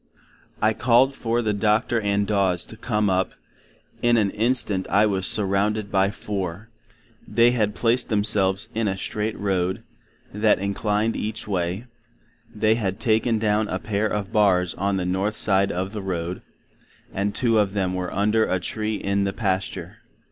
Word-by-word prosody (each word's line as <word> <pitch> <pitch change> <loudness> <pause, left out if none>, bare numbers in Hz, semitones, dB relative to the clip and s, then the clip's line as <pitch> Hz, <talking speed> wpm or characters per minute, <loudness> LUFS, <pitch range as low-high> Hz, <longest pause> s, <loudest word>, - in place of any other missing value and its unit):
I 110 +1 +4
called 130 +3 +3
for 120 -2 -1
the 105 -1 0
Doctor 110 +3 +1
and 100 0 0
Daws 95 -4 +1
to - - -11
come 105 -2 -1
up;—in 95 +5 -3
an 100 -3 +2
Instant 110 -4 +1
I 100 +3 +4
was 95 -3 0
surrounded 100 +1 +2
by 95 0 +2
four;—they 105 +4 -3
had 105 -4 0
placed 120 +1 +1
themselves 100 -2 +2
in 110 -1 -1
a 95 -1 -2
Straight 105 +2 -3
Road, 95 +1 -1 0.5
that 105 +1 +3
inclined 105 +3 -1
each 110 +1 -4
way; 95 +2 -2 0.7
they 110 0 +2
had 100 -4 -2
taken 115 -1 +1
down 105 0 +1
a - - -2
pair 105 0 -1
of 105 -1 -3
Barrs 95 -5 +3
on 100 +1 -1
the 90 - -2
North 95 +4 -1
side 100 -1 +3
of 95 +3 -3
the 105 - -4
Road, 90 -1 -4 0.7
and 100 +1 -2
two 115 -3 +2
of 100 -2 +1
them 95 -3 -1
were 90 -1 -3
under 105 +3 +1
a 95 - 0
tree 110 +4 -3
in 100 -1 -1
the 100 - -2
pasture. 95 -3 -3
105 Hz, 160 wpm, -23 LUFS, 95-110 Hz, 0.7 s, I